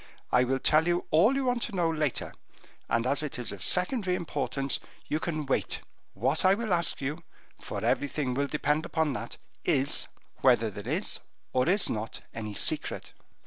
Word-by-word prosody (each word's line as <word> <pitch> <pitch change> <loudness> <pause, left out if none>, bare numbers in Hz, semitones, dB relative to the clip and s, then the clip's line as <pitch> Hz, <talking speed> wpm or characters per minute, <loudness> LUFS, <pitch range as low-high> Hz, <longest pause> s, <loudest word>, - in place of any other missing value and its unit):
I 125 0 +4
will 135 +1 +1
tell 155 +4 +4
you 175 0 +1
all 195 +12 +5
you 275 -1 0
want 245 -1 +1
to 230 - -2
know 175 -2 +2
later, 155 -4 -1 0.6
and 115 0 +1
as 140 +3 +2
it 150 -4 -4
is 120 -3 -3
of 100 -3 -8
secondary 185 - +3
importance, 140 -4 -1 0.3
you 155 - -1
can 155 -3 -2
wait. 135 - 0 0.3
What 135 +6 +1
I 185 - +6
ask 190 -9 +1
you 150 +5 -3 0.4
for - - -5
everything 140 -2 0
will 140 +2 0
depend 150 +1 0
upon 160 -3 0
that 120 -1 -5 0.3
is, 140 -3 +2 0.3
whether 115 -4 +3
there 105 +6 -6
is 180 +6 -1 0.3
or 130 +4 +2
is 200 +3 +3
not 110 0 -4
any 105 -2 -5
secret?" - - 0
150 Hz, 175 wpm, -29 LUFS, 130-175 Hz, 0.6 s, I